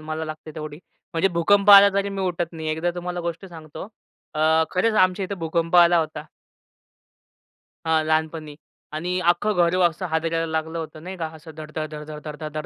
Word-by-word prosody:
मला 155 +1 -4
लागते 155 0 -8
तेवढी. 155 -1 -7 0.3
म्हणजे 165 +4 +2
भूकंप 200 +4 +4
आला 200 0 +10
तरी 200 0 0
मी 195 -1 -5
उठत 175 -2 -2
नाही. 160 -1 -5
एकदा 160 +3 -1
तुम्हाला 180 0 -4
गोष्ट 170 +2 -5
सांगतो. 160 +1 -10 0.5
अ, 160 +1 +3
खरंच 215 +5 +1
आमच्या 185 -1 +3
इथे 200 +2 -4
भूकंप 165 0 -1
आला 175 0 +6
होता. 160 -1 -3 1.6
हां, 160 -1 +2
लहानपणी 155 -1 -1 0.4
आणि 175 +4 -2
अख्खं 190 +5 0
घर 175 0 +3
असं 170 +3 -6
हादरायला 165 +1 -1
लागलं 160 +1 -2
होतं 155 -1 -7
नाही 190 +1 -7
का 165 -3 -3
असं 160 +1 -12
धडधड 155 0 -6
धड 150 0 -7
धड 155 - -6
धड 150 -1 -6
धड 155 -1 -6
165 Hz, 180 wpm, -23 LUFS, 155-180 Hz, 1.6 s, आला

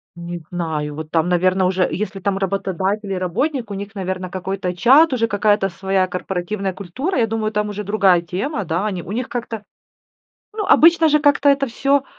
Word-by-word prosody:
Не 170 0 -6
знаю, 155 -4 -3
вот 155 0 -7
там, 165 +1 +1
наверно, 185 +1 +2
уже, 185 0 +2
если 195 +3 -3
там 195 0 -1
работодатель 195 +1 -2
и 190 - -1
работник, 235 - -2
у - - -3
них, 200 +1 -7
наверно, 185 -1 -4
какой-то 185 0 -4
чат, 270 - +5
уже 230 -2 +1
какая-то 205 -1 +2
своя 190 +1 0
корпоративная 185 +2 -3
культура. 255 - -3
Я 225 - +2
думаю, 220 -1 -2
там 210 0 -1
уже 210 0 -5
другая 195 -4 +3
тема, 195 - -3
да, 170 +6 -1
они 185 -4 -3
у 185 - -8
них 245 +4 -3
как-то, 225 -3 -5 0.9
ну, 425 -2 -3
обычно 330 0 +6
же 300 - +4
как-то 285 -1 +4
это 275 0 +3
всё, 275 +4 +1
195 Hz, 185 wpm, -20 LUFS, 180-230 Hz, 0.9 s, обычно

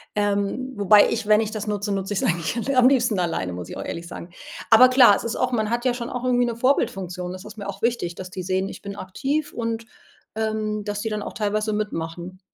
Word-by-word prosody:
Ähm, 205 +5 -1
wobei 205 0 +6
ich 230 -1 -2
wenn 215 0 +5
ich 220 - -2
das 215 -1 -5
nutze, 205 -1 -2
nutze 195 0 -2
ich's 195 - -1
eigentlich 170 +3 0
l 275 - +1
am 255 -1 +6
liebsten 240 -5 +3
alleine, 165 - -1
muss 90 -1 -7
ich - - -7
auch - - -4
ehrlich 170 0 -5
sagen. 170 - -8 0.4
Aber 245 +3 +8
klar, 255 -5 +7
es - - -4
ist 230 - -3
auch 255 0 0
man 220 -3 0
hat 240 +1 -1
ja 250 - +3
schon 240 0 -5
auch 250 -1 -4
irgendwie 245 -1 +2
eine 235 - -3
Vorbildfunktion. 185 -9 0
Das 185 +2 -9
ist 210 +1 -11
mir 200 -2 -6
auch 200 0 -7
wichtig, 230 -7 0
dass 185 +1 -8
die 185 0 -6
sehen, 190 +1 -1
ich - - -10
bin 200 0 -6
aktiv 275 +11 -2
und, 230 -1 -3 0.5
ähm, 215 -1 -2
dass 205 0 -3
die 220 - -2
dann 210 -1 -3
auch - - -6
teilweise 215 0 -1
mitmachen. 180 -3 -4
210 Hz, 245 wpm, -23 LUFS, 190-235 Hz, 0.5 s, Aber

